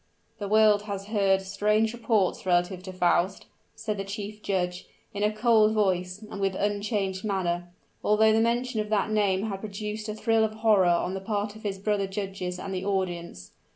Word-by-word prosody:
"The 205 - -3
world 215 0 +5
has 200 -1 -4
heard 195 -3 +2
strange 210 +3 +1
reports 220 -5 +1
relative 180 0 +1
to 185 0 -8
Faust," 185 +1 +1 0.3
said 215 -1 -3
the 195 - -2
chief 205 +1 -6
judge, 180 -3 -2 0.3
in 205 - -4
a 210 0 +3
cold 215 -1 +4
voice 190 -1 0
and 205 -1 -7
with 195 -1 0
unchanged 205 -1 -1
manner, 175 -4 -1 0.3
although 215 +1 +4
the 220 - +3
mention 235 0 0
of 210 - -6
that 215 0 +1
name 200 -2 +2
had 200 -3 -3
produced 210 +1 -5
a 210 - -3
thrill 225 0 +2
of 215 0 0
horror 215 -4 +4
on 175 +1 +1
the 190 - -4
part 205 0 -2
of 220 - -12
his 200 -2 -3
brother 200 0 0
judges 190 -2 -4
and 190 +1 -5
the 185 0 -3
audience. 175 - -3
200 Hz, 190 wpm, -27 LUFS, 190-215 Hz, 0.3 s, world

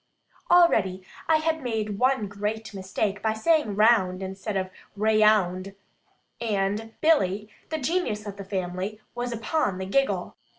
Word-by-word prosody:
Already, 200 - +4 0.2
I 320 - +5
had 320 0 -1
made 215 -5 -2
one 255 -4 +2
great 210 +2 -4
mistake, 195 +1 -2
by 220 -1 +1
saying 290 -2 +2
"round" 200 -4 +3
instead 195 +2 -4
of 185 0 -2 0.3
"raound," 210 -3 +3 0.7
and 210 0 -1
Billy, 210 - +2 0.2
the 315 - -2
genius 270 - -1
of 200 -1 -7
the 200 - -6
family, 190 +2 -4
was 245 0 -3
upon 230 - -1
the 190 - -4
giggle. 275 +8 0
215 Hz, 135 wpm, -26 LUFS, 195-240 Hz, 0.7 s, I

